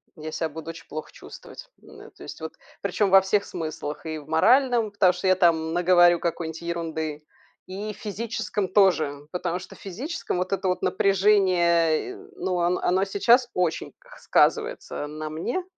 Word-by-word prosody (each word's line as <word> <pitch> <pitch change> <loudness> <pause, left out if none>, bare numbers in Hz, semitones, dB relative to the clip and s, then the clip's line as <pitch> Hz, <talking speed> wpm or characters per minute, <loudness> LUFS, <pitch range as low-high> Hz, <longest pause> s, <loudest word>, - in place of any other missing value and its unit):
Я 155 -1 -7
ся 160 - -2
буду 160 +2 -8
оч 165 - -9
плохо 155 +1 -7
чувствовать. - - -12
Да, - - -15
то - - -15
есть - - -9
вот. - - -6 0.3
Причем 205 -2 0
во 195 +1 +8
всех 200 +2 +1
смыслах: 155 -2 -6
и 155 -1 -4
в 145 - -15
моральном, 235 - +3
потому 195 -3 +4
что 180 +2 -3
я 185 - +5
там 165 -3 +2
наговорю 175 -1 +5
какой-нибудь 165 -1 -4
ерунды, 160 -3 -4 0.4
и 205 +3 -6
в - - -17
физическом 210 -1 -3
тоже, 160 -8 +2
потому 180 -1 -2
что - - -12
в - - -19
физическом 230 - -5
вот 180 - -2
это 195 -1 -1
вот 180 - -1
напряжение, 185 - +2
э, - - -9 0.2
ну, 190 - -2
он 175 +1 +1
оно 190 +2 +1
сейчас 235 +5 +3
очень 180 -3 -1 0.3
сказывается 450 - 0
на 155 +1 -6
мне, 170 - -3
180 Hz, 170 wpm, -25 LUFS, 160-200 Hz, 0.4 s, во